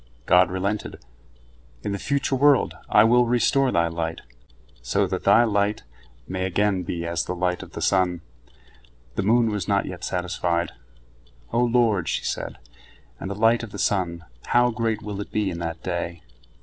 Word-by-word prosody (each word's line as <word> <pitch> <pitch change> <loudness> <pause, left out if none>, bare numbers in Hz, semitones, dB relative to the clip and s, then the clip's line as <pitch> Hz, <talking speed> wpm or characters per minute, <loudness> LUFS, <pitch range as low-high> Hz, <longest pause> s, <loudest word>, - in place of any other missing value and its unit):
God 90 0 +5
relented: 100 +3 -3 0.9
"In - - -2
the 100 - -3
future 140 +1 0
world 140 0 +4 0.2
I - - +6
will 120 +2 +4
restore 125 +2 +2
thy 85 -1 +2
light, 80 0 -3 0.6
so - - +1
that - - -4
thy 120 - +6
light 105 - 0 0.4
may 95 0 -2
again 95 0 +1
be 85 -1 -4
as 85 0 -1
the 90 - -3
light 90 0 -1
of - - -11
the - - -4
sun." 90 -3 +2 0.9
The - - -1
moon 115 +3 +3
was 105 -5 -3
not - - +1
yet - - -7
satisfied. 90 -1 -1 0.8
"O 120 - +2
Lord," 115 -7 +2
she - - -1
said, - - -4 0.6
"and 95 - -5
the 100 - -4
light 115 +3 +3
of 115 - -7
the 100 - -7
sun, 85 -4 -1 0.2
how 120 0 +3
great 110 -1 -2
will 105 -1 -5
it - - -8
be 105 -3 0
in 85 - -6
that 80 -1 -5
day?" 85 -1 -4
100 Hz, 175 wpm, -24 LUFS, 90-115 Hz, 0.9 s, I